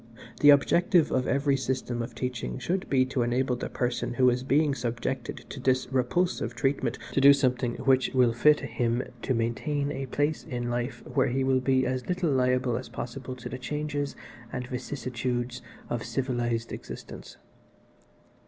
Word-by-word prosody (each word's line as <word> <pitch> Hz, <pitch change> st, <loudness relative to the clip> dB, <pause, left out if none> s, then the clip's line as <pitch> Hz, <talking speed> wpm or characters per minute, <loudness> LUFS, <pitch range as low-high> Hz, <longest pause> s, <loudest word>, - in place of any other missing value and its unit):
The 145 Hz, -, +7 dB
objective 170 Hz, +4 st, +5 dB
of 125 Hz, -, +1 dB
every 140 Hz, 0 st, +2 dB
system 130 Hz, -2 st, -2 dB
of 115 Hz, -, -6 dB
teaching 120 Hz, -, -3 dB
should 185 Hz, +2 st, -2 dB
be 130 Hz, -2 st, +4 dB
to 130 Hz, -1 st, -1 dB
enable 125 Hz, +2 st, +1 dB
the 125 Hz, -, -5 dB
person 120 Hz, -1 st, -2 dB
who 125 Hz, 0 st, +5 dB
is 125 Hz, +1 st, -1 dB
being 140 Hz, +3 st, +2 dB
subjected 120 Hz, +1 st, -3 dB
to -, -, -7 dB
this 130 Hz, 0 st, +1 dB
repulsive 130 Hz, -1 st, 0 dB
treatment 130 Hz, -2 st, 0 dB
to 135 Hz, -, +1 dB
do 140 Hz, +1 st, +9 dB
something 125 Hz, -3 st, 0 dB
which 130 Hz, 0 st, +2 dB
will 125 Hz, -2 st, +4 dB
fit 150 Hz, +5 st, +4 dB
him 120 Hz, -1 st, -1 dB, 0.2 s
to 130 Hz, -, 0 dB
maintain 140 Hz, +6 st, -1 dB
a 135 Hz, -2 st, -4 dB
place 145 Hz, +4 st, 0 dB
in 120 Hz, -5 st, -3 dB
life 120 Hz, +1 st, -3 dB
where 135 Hz, -, +1 dB
he 130 Hz, +2 st, 0 dB
will 130 Hz, -1 st, +2 dB
be 130 Hz, 0 st, +2 dB
as 130 Hz, 0 st, -2 dB
little 180 Hz, -3 st, +1 dB
liable 125 Hz, -2 st, +2 dB
as 130 Hz, -, -7 dB
possible 130 Hz, +1 st, -6 dB
to 125 Hz, -, -8 dB
the 130 Hz, -, -6 dB
changes 145 Hz, +2 st, -3 dB, 0.4 s
and 125 Hz, 0 st, -4 dB
vicissitudes 125 Hz, -1 st, -3 dB, 0.3 s
of 120 Hz, -2 st, -3 dB
civilised 120 Hz, -2 st, -2 dB
existence. -, -, -9 dB
130 Hz, 165 wpm, -28 LUFS, 120-140 Hz, 0.4 s, do